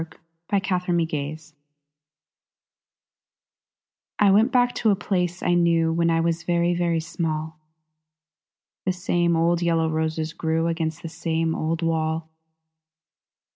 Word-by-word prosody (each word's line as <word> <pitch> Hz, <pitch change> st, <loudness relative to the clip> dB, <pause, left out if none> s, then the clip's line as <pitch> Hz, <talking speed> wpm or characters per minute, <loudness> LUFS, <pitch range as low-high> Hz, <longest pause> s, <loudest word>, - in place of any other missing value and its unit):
Aline 200 Hz, -1 st, +2 dB
Kilmer 180 Hz, -2 st, -1 dB
Remembrance 160 Hz, -2 st, -2 dB, 2.6 s
I 205 Hz, -2 st, +5 dB
WENT 220 Hz, +6 st, +4 dB
back 245 Hz, -1 st, +3 dB
to 225 Hz, -, +1 dB
a 200 Hz, -, +4 dB
place 180 Hz, -2 st, -2 dB
I 175 Hz, -, +2 dB
knew 165 Hz, -2 st, +3 dB
When 170 Hz, 0 st, +2 dB
I 165 Hz, 0 st, +2 dB
was 165 Hz, 0 st, 0 dB
very, 175 Hz, 0 st, +1 dB
very 170 Hz, -1 st, 0 dB
small; 160 Hz, -1 st, -4 dB, 1.3 s
The 185 Hz, -, +2 dB
same 175 Hz, -2 st, +1 dB
old 170 Hz, +1 st, +2 dB
yellow 165 Hz, -1 st, +2 dB
roses 160 Hz, 0 st, -2 dB
grew 160 Hz, 0 st, -1 dB
Against 165 Hz, -2 st, -2 dB
the -, -, -4 dB
same 165 Hz, 0 st, -1 dB
old 165 Hz, +2 st, -2 dB
wall. 160 Hz, 0 st, -1 dB
165 Hz, 125 wpm, -24 LUFS, 160-175 Hz, 2.6 s, I